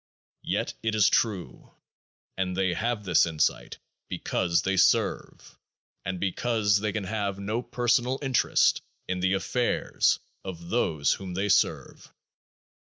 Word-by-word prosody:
Yet - - -2
it 110 -1 -1
is 105 -2 +5
true; 95 - -1 0.6
and 90 -1 -2
they 95 -2 +1
have 115 +3 -2
this 90 -3 +3
insight 80 -2 -1 0.3
be - - -3
cause 85 -2 0
they 95 0 0
serve, 95 - 0 0.4
and 95 0 -4
because 105 +2 +1
they 105 0 -1
can 105 -1 -3
have 100 0 -2
no 105 +4 -2
personal 120 +1 0
interest 135 -2 +2 0.3
in 95 0 -2
the 95 +1 +1
affairs 120 +5 +1 0.3
of 85 -3 -8
those 80 -11 +1
whom 95 -2 -7
they 100 +2 -1
serve. - - 0
100 Hz, 135 wpm, -27 LUFS, 90-110 Hz, 0.6 s, is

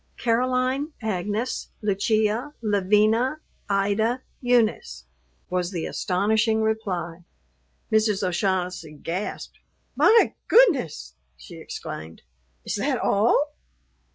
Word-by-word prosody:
"Caroline 255 +5 0
Agnes 210 +3 -2
Lucia 215 +6 0
Lavina 215 +7 +2 0.3
Ida 205 +5 +1 0.2
Eunice," 220 - +1 0.4
was 180 -1 -1
the 175 -4 -4
astonishing 220 +4 +1
reply. 180 -6 -2 0.7
Mrs. 215 -3 +2
O'Shaughnessy 180 -3 -1
gasped. 170 +7 -5 0.4
"My 450 +1 +5
goodness," 335 - +3 0.2
she 60 0 -12
exclaimed; 80 +1 -8 0.4
"is - - -3
that - - 0
all?" - - +2
210 Hz, 85 wpm, -24 LUFS, 180-235 Hz, 0.7 s, My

